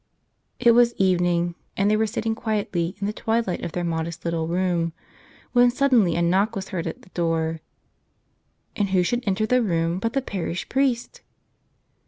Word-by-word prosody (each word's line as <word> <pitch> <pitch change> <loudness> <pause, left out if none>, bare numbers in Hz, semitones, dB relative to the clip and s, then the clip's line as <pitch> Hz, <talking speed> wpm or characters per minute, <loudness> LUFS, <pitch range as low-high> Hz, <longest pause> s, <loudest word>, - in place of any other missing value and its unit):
It 235 - +6
was 235 0 +4
evening, 175 -2 +2 0.2
and 195 - +2
they - - +4
were 220 +1 +1
sitting 225 0 -2
quietly 205 -6 -2
in 200 - -2
the 210 - -1
twilight 225 -4 -1
of 165 - -4
their 175 - -2
modest 165 0 -3
little 165 -1 -1
room, 170 -1 0 0.6
when 245 0 +5
sud¬ 275 +3 +1
denly 200 -10 +4
a 170 - +2
knock 195 +6 +2
was 195 -1 -5
heard 175 -4 -3
at 165 - -6
the - - -18
door. 165 -2 -1 1.2
And 205 -4 0
who 185 -1 +3
should 240 +7 -1
enter 200 +2 +1
the 250 +3 +3
room 170 -4 0
but 230 +3 -2
the 275 - +1
parish 185 -5 -4
priest! 260 -3 0
190 Hz, 180 wpm, -24 LUFS, 170-225 Hz, 1.2 s, It